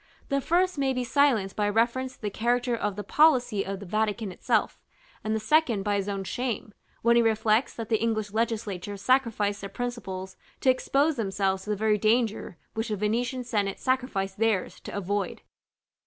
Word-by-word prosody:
The 275 0 +1
first 350 +2 +1
may 270 -1 +2
be 255 -1 -1
silenced 240 -7 +2
by 210 -1 +1
a - - +1
reference 245 +4 +1
to - - -31
the 210 - -1
character 240 +3 +1
of 210 -3 -2
the 205 - -5
policy 245 -5 +3
of 195 0 -5
the 200 - -8
Vatican 215 +1 -1
itself; - - 0 0.4
and 215 0 0
the - - 0
second 235 -3 +2
by 205 0 0
his 200 0 -2
own 195 -1 -2
shame, 230 0 -3 0.3
when 235 +1 +5
he - - +6
reflects 220 +1 +2
that 225 -2 -6
the 220 -2 +1
English 220 -2 0
legislature 210 -3 -2
sacrificed 210 -3 +1
their 200 - -6
principles 195 -5 -5 0.2
to 260 - +5
expose 280 +3 +1
themselves 195 -3 -1
to - - -8
the 210 - +1
very 210 0 +1
danger 220 -4 +1 0.2
which 225 +1 -2
the 210 - 0
Venetian 235 +5 -1
senate 205 -5 -1
sacrificed 220 -7 -1
theirs 220 -4 0
to - - -9
avoid. 200 -1 -2
220 Hz, 185 wpm, -27 LUFS, 200-245 Hz, 0.4 s, he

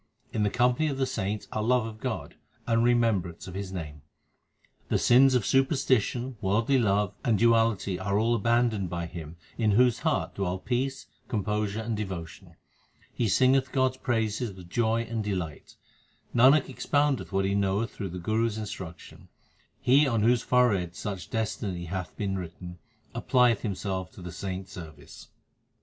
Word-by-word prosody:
In 110 - 0
the 105 - +2
company 125 +6 +2
of 140 -3 -2
the 135 - +1
saints 105 -3 -3
are 110 - -2
love 120 +1 +2
of 110 -1 -8
God - - -4 0.3
and 115 0 +2
remem 120 -4 +3
brance 85 0 -10
of 90 - -8
His 95 0 -5
name. 75 -6 -6 0.9
The - - +2
sins 130 +2 +5
of 120 -6 +1
superstition, 130 -3 +1
worldly 115 +7 +2
love, 105 -3 +1
and 115 -3 +2
duality 115 -4 +2
all 100 +4 +1
are - - +3
abandoned 115 -3 +1
by 85 0 -3
him, 85 -1 -8 0.2
In 110 -3 +3
whose 125 +1 +4
heart - - 0
dwell 95 -2 -2
peace, 130 +6 -2 0.2
composure, 105 -1 -1
and 110 0 -2
devotion; 95 -6 -6 0.6
he 120 - 0
singeth 130 +5 +3
God 130 -1 +2
s 130 - -16
praises 115 -1 -1
with 90 -2 -13
joy 115 0 +1
and 115 -1 -3
delight 90 -7 -4 0.6
Nanak 130 +4 +6
expoundeth 145 0 0
what 95 0 +1
he 100 - 0
knoweth 100 +3 0
through 100 -3 -5
the 90 - -6
Guru 110 +6 0
s 110 -1 -4
instruction 95 -6 -8 0.5
he 140 +4 +4
on 115 -5 +1
whose 120 +1 +4
forehead 100 -9 +2
such 95 -5 -5
destiny 105 -5 -3
hath 90 +1 -5
been 95 -2 -2
written, 90 0 -8 0.3
applieth 125 -4 +3
himself 95 -3 -3
to 90 - -11
the 90 - -6
saints 95 +1 -5
service. 80 -5 -11
105 Hz, 165 wpm, -28 LUFS, 95-120 Hz, 0.9 s, Nanak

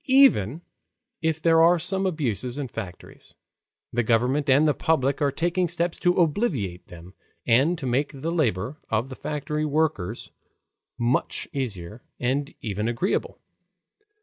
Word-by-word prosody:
Even 175 - +5 0.6
if 160 -1 0
there 165 0 +4
are 170 +2 +6
some 190 +3 -1
abuses 130 - -2
in 145 -2 -3
factories, 100 -7 -9 0.6
the 120 - +2
government 125 +5 +1
and 140 +4 +5
the 150 - +3
public 140 -3 +1
are 140 -1 +3
taking 175 +5 0
steps 170 0 -2
to 175 0 +2
obviate 145 - 0
them 90 +1 -12 0.3
and 135 +9 +3
to 145 - -6
make 130 +4 0
the 150 +3 -4
labor 130 - -1
of 115 +4 0
the 130 - -7
factory 150 +2 -3
workers 145 - -1 0.7
much 120 +2 0
easier, 110 -5 -4 0.2
and 135 +3 -1
even 105 0 -2
agreeable. 120 - -1
140 Hz, 140 wpm, -25 LUFS, 115-160 Hz, 0.7 s, are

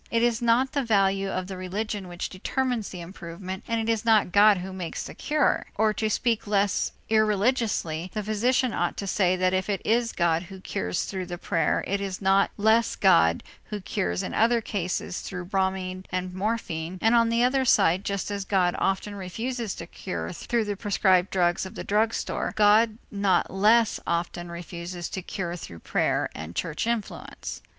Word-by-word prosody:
It 230 0 +1
is 240 0 +2
not 240 +3 +3
the 285 - 0
value 195 -3 +2
of 185 -1 -2
the 190 0 -7
religion 195 +2 -4
which 175 0 -4
determines 245 +3 -2
the 180 - -7
improvement, 185 +1 -7
and 230 -1 0
it 225 - -2
is 225 -2 +1
not 220 -5 +4
God 205 +1 +6
who 185 +1 -6
makes 180 -3 -4
the - - -8
cure; 300 0 +1
or 215 0 +2
to 220 0 -1
speak 230 -1 0
less 205 -1 +1 0.2
irreligiously, 210 -6 +1
the 215 - -3
physician 240 +4 +1
ought - - -1
to 200 - -3
say 185 -1 +2
that 185 0 +1
if 185 +2 0
it 200 -2 0
is 230 +1 +2
God 170 -2 +1
who 190 -1 -9
cures 90 - -2
through 185 -2 -4
the 175 -1 -5
prayer, 170 -1 0
it 200 +1 -1
is 195 -2 -4
not 195 0 +3
less 220 +2 +3
God 85 - +4 0.2
who 210 - -5
cures 90 - -2
in - - -4
other 235 +2 +3
cases 185 -4 -3
through 180 -2 -6
bromide 190 0 -2
and 185 0 -3
morphine, 185 -4 -3
and 225 +4 +3
on 230 -1 +4
the 230 +1 +2
other 260 +2 +3
side 185 -6 +4
just 200 0 -2
as 200 -1 -2
God 185 -3 +2
often 195 +2 0
refuses 225 +4 -4
to - - -7
cure - - -5
through 235 -2 -1
the 205 -1 -2
prescribed 190 -3 +2
drugs 175 -2 +1
of 190 - -8
the - - -5
drug 220 +2 +1
store, - - -3
God 215 +1 +4
not 200 -2 +1
less 215 +4 +4
often 170 0 -2
refuses 170 0 -6
to 190 - -4
cure 175 -1 -4
through 85 - -9
prayer - - 0
and 80 +2 -8
church 165 +5 -2
influence. 235 -3 -4
195 Hz, 190 wpm, -26 LUFS, 180-220 Hz, 0.2 s, God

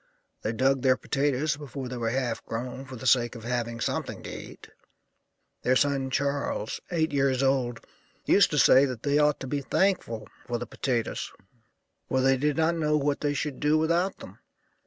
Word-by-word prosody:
They 110 - -1
dug 130 +3 +2
their 130 -1 +4
potatoes 145 +1 0
before 140 -2 -6
they 125 0 -5
were 115 -1 -1
half 120 -2 -2
grown, 125 +4 -5
for 130 -1 -9
the 125 - -9
sake 120 -1 +3
of 115 - -9
having 120 -1 -2
something - - -3
to - - -7
eat. - - -10 0.9
Their 130 - +2
son 135 -1 +1
Charles, 140 -5 -1
eight 160 -3 0
years 135 -1 +2
old, 130 -3 0 0.4
used - - +5
to - - -2
say 135 +2 +7
that 125 -4 -5
they 145 0 +2
ought 150 -1 +3
to - - -4
be 140 +2 -2
thankful 140 - 0 0.2
for 120 -1 -1
the 120 - -5
potatoes, 120 -3 -2 0.8
for 130 - +1
they 135 +1 +4
did 145 +2 0
not 160 +1 +3
know 150 -1 +2
what 145 0 0
they 145 -1 0
should 145 -1 -3
do 150 +1 +3
without 170 +4 +1
them. - - -12
135 Hz, 185 wpm, -27 LUFS, 125-145 Hz, 0.9 s, say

